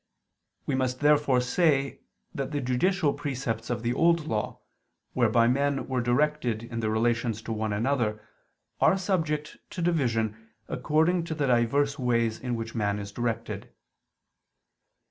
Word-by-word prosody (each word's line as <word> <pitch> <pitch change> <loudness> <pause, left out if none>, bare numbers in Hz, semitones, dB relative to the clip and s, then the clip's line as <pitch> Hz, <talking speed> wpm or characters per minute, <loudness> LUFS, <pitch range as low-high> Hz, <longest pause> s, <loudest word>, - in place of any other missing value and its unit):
We 145 - -1
must 130 0 -1
therefore 145 -3 +4
say 140 +1 +1 0.3
that 135 -1 -3
the 145 -1 -2
judicial 145 +5 +1
precepts 120 -5 -3
of 120 -2 -2
the 120 +1 +1
Old 170 0 +3
Law, 110 -8 -3 0.5
whereby 115 -1 +3
men 140 +2 +1
were 130 -2 0
directed 120 -2 +1
in 115 0 -5
their 110 -1 0
relations 115 0 0
to 115 - -3
one 110 -1 -2
another, 110 0 0 0.6
are 190 - +4
subject 160 -6 -1
to - - -8
division 115 -9 0 0.2
according 160 +6 +1
to 160 - -4
the 150 -2 0
divers 140 +4 +2
ways 115 -3 +1
in 125 -1 -2
which 115 0 -5
man 105 -3 0
is 100 -1 -6
directed. 115 +1 -3
125 Hz, 145 wpm, -27 LUFS, 115-150 Hz, 0.6 s, therefore